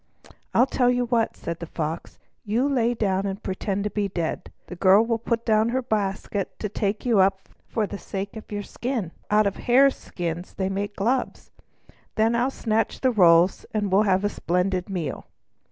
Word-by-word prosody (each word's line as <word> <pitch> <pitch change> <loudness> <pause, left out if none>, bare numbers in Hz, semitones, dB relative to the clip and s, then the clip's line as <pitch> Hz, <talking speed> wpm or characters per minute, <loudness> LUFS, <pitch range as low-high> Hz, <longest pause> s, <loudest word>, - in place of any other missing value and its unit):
"I 245 - +5
tell 250 -2 +2
you 245 0 +1
what," 235 -2 0
said 170 0 -5
the 170 - -6
Fox. 160 +1 -4 0.3
"You 230 +6 +1
lie 245 -4 +2
down 195 -3 0
and 195 +2 -5
pretend 195 +1 -2
to 210 - -2
be 205 0 -1
dead. 170 -4 -4
The 180 - -8
girl 195 +5 +5
will 230 -1 0
put 230 0 -2
down 220 0 +3
her 260 +2 -1
basket 200 -3 -2
to 210 - -3
take 205 +2 -2
you 230 -5 +3
up 195 0 +2 0.2
for 220 - -1
the 200 0 -7
sake 195 +2 -5
of 220 - -10
your 205 0 -3
skin, 235 -6 -3 0.2
for 210 - +2
out 215 0 +5
of 200 - -1
hare 270 +3 +5
skins 175 -6 -6
they 190 -1 -1
make 200 +1 -3
gloves; 245 +6 -1 0.6
then 220 +1 +3
I'll 245 +3 +2
snatch 225 -4 -1
the 260 - +3
rolls, 175 -4 +5
and 205 -2 0
we 190 - +4
shall - - +6
have 190 +1 +2
a 205 - +2
splendid 180 0 -1
meal!" 170 -8 -4
205 Hz, 200 wpm, -24 LUFS, 190-230 Hz, 0.6 s, shall